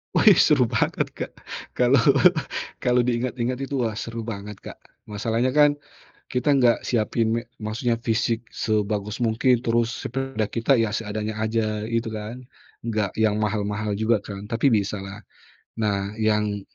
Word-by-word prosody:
Wih - - +7
seru - - +4
banget, - - 0
Kak. - - -5 0.4
Kalo 125 +2 +3 0.9
kalo 125 -1 +3
diingat-ingat 125 +1 -1
itu 135 0 -3
wah 115 -4 -1
seru 115 0 -5
banget, 105 -2 -6
Kak. - - -9 0.3
Masalahnya 115 +5 -1
kan 145 -1 +5 0.5
kita 135 +3 +2
enggak 125 -4 +4
siapin 115 -1 +1
me 115 - 0 0.2
maksudnya 115 +2 -1
fisik 115 0 -1
sebagus 105 -1 -1
mungkin 120 +1 +2
terus 115 -1 +1 0.2
sepeda 135 -4 -2
kita 120 +4 +2
ya 115 -2 +1
seadanya 110 -1 -3
aja 110 -1 -1
itu 115 0 0
kan, 110 +3 -6 0.4
enggak 105 -4 0
yang 110 -1 +3
mahal-mahal 105 0 -1
juga 110 -1 +2
kan 100 0 -8
tapi 115 +5 +2
bisa 105 -2 0
lah. 100 +2 -9 0.6
Nah 100 -1 -1
yang 105 -2 +1
115 Hz, 145 wpm, -24 LUFS, 105-120 Hz, 0.9 s, Wih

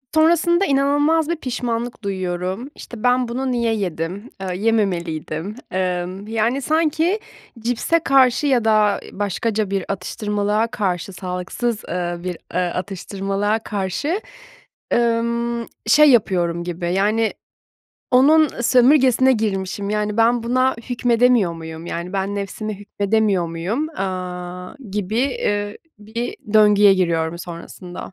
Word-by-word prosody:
Sonrasında 340 +3 +4
inanılmaz 290 +3 +2
bir 340 - +1
pişmanlık 240 -5 -3
duyuyorum. 185 +4 -3
İşte, 235 -1 -10
ben 250 0 +3
bunu 255 +2 -2
niye 235 -2 +1
yedim? 185 +2 -4
Aaa, 190 -1 -4
yememeliydim. 180 -3 -1 0.2
Emm, 185 +2 -2
yani, 230 +5 0
sanki 320 - +1 0.4
cipse 245 +8 +1
karşı 270 -1 +3
ya 245 -5 +2
da 215 -2 +3
başkaca 205 +1 -1
bir 195 -2 -1
atıştırmalığa 210 +1 -1
karşı, 195 -5 -2
sağlıksız, 185 +5 -3
ııı, 175 0 -3
bir, 180 -2 -3 0.2
ııı, 180 - +2
atıştırmalığa 195 +3 -2
karşı, 220 - -2 0.7
ımm, 235 0 0 0.2
şey 300 +6 +7
yapıyorum 175 -7 +2
gibi, 175 0 -3
yani, 215 +3 +2 0.8
onun 300 +4 +6
sömürgesine 260 +1 +5
girmişim. 200 -3 -2
Yani, 210 0 -1
ben 230 +1 +3
buna 255 +2 +2 0.2
hükmedemiyor 240 -5 +3
muyum? 160 0 -8
Yani, 175 +2 -4
ben 195 +1 -1
nefsime 200 +1 -4
hükmedemiyor 205 -3 +1
muyum? 185 - -2
Aaa, 180 - -5 0.2
gibi, 210 +1 -2
eee, 205 -6 -1 0.2
bir 225 +3 -5 0.2
döngüye 210 -2 +6
giriyorum 170 -2 0
sonrasında. 175 +1 -8
210 Hz, 115 wpm, -21 LUFS, 185-245 Hz, 0.8 s, şey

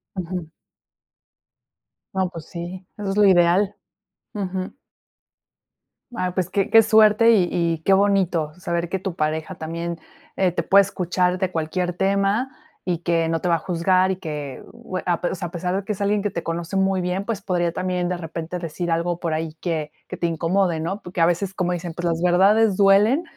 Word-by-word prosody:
Ujú. 180 -3 -4 1.7
No, 190 -1 0
pues 165 -3 -9
sí, 175 +2 -7
eso 205 -2 -4
es 195 - -3
lo 210 - +6
ideal. 185 +2 +4 0.6
Ujú. 190 +1 -4 1.4
Ah, 185 -4 -2
pues 185 -1 -1
que 195 0 -1
que 225 0 +8
suerte 220 +1 +5
y 185 -5 +3
y 165 -2 -1
qué 195 - +4
bonito 190 -6 +2
saber 170 -1 -2
que 190 - -1
tu 190 -2 -5
pareja 155 +4 -2
también, 170 +1 -5 0.4
eh, 185 -2 +2
te 170 0 -2
puede 200 +4 +6
escuchar 180 -1 0
de 185 0 -1
cualquier 175 +2 -2
tema 200 +6 +1 0.3
y 175 -3 -1
que 165 -1 0
no 165 -1 -1
te - - -1
va 170 - +4
a - - +1
juzgar 185 +2 +2
y 190 - 0
que 150 -6 -6
bue 185 - -6
ape 175 0 0
o - - -3
sea, 175 -1 -5
a - - -21
pesar 180 +1 -2
de 195 - -2
que - - -3
es 205 - -4
alguien 200 0 +1
que 205 - -1
te 170 - -3
conoce 170 +3 -3
muy 190 -1 +2
bien, 180 +2 -2
pues 210 -3 -3
podría 175 -3 0
también 180 -1 -1
de 180 - -2
repente 165 +1 -5
decir 170 0 -4
algo 170 +1 0
por 165 -3 -2
ahí 160 0 -3
que 155 -4 -2 0.2
que - - -7
te - - -2
incomode, 170 +1 +1
¿no? 170 +6 -3
Porque 175 -1 -4
a 165 - +6
veces, 180 +2 -1
como 180 -2 -1
dicen, 175 -1 -5
pues 175 +1 -5
las 165 0 -1
verdades 195 +4 +4
duelen, 205 - +4
180 Hz, 200 wpm, -22 LUFS, 170-195 Hz, 1.7 s, que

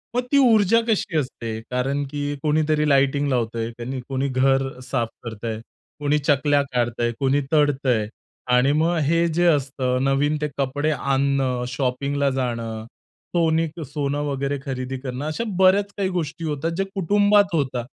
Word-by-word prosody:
मग 245 - +3
ती 280 - +4
ऊर्जा 230 -4 +5
कशी 200 -6 0
असते? 115 -5 -3
कारण 135 +3 0
की 145 0 -3
कोणीतरी 150 0 +2
लाइटिंग 140 +1 +3
लावतंय 115 -2 -1
आणि 130 +2 -4
कोणी 135 +1 -1
घर 135 0 +1
साफ 120 -4 0
करतंय, 110 -1 -5 0.4
कोणी 145 0 +1
चकल्या 145 0 +2
काढतंय, 120 -1 0
कोणी 135 +1 +2
तळतंय. 135 -7 +2 0.4
आणि 125 +3 +4
मग 170 +2 +2
हे 170 +3 +2
जे 175 +2 +2
असतं, 130 -4 +1
नवीन 140 +2 +1
ते 150 - 0
कपडे 140 +3 0
आणणं, 135 -2 0
शॉपिंगला 140 +2 -1
जाणं, 115 -4 -3 0.5
सोनी 165 -1 +2 0.2
सोनं 145 +1 -2
वगैरे 140 0 -2
खरेदी 130 -1 -4
करणं, 130 +1 -5
अशा 155 +9 -2 0.2
बऱ्याच 195 +2 +4
काही 195 -2 0
गोष्टी 165 -2 -3
होतात 150 +2 -2
जे 195 - +1
कुटुंबात 205 +1 +3
होतात. 130 -5 -1
140 Hz, 145 wpm, -23 LUFS, 130-155 Hz, 0.5 s, ऊर्जा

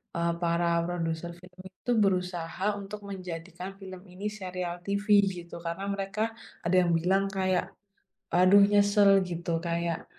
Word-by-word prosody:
eee, 170 0 +1
para 170 0 +2
produser 170 -1 -3
film 180 +1 -17
itu 215 +6 -5
berusaha 180 -2 0
untuk 200 +1 -8
menjadikan 185 0 -7
film 190 -2 -9
ini 190 +2 -6
serial 185 -4 -5
TV 200 0 -2 0.4
gitu 170 0 -10
karena 170 +4 -3
mereka 200 +2 -2 0.4
ada 175 +2 +2
yang 175 - +1
bilang 190 +3 +2
kayak, 185 -2 +1 0.7
"aduh 185 +3 +6
nyesel" 205 0 +5 0.2
gitu 170 0 -4 0.2
kayak, 170 -1 -2
185 Hz, 135 wpm, -28 LUFS, 170-195 Hz, 0.7 s, aduh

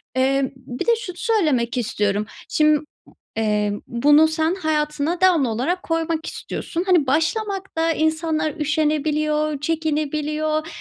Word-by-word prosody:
eee, 265 +1 +1
bir 255 -1 -6
de - - +6
şunu 400 -6 -7
söylemek 310 - +1
istiyorum. 210 -3 0 0.2
Şim 305 -1 +3 0.5
eee, 210 -1 +1 0.2
bunu 290 +6 +5
sen 315 +2 0
hayatına 310 0 -1
devamlı 335 -10 +4
olarak 290 +12 -1
koymak 330 0 -1
istiyorsun. 340 +2 -4
Hani, 340 -7 +4
başlamakta 330 - 0
insanlar 315 -1 0
üşenebiliyor, 305 0 0
çekinebiliyor, 310 0 -1
305 Hz, 110 wpm, -22 LUFS, 275-325 Hz, 0.5 s, de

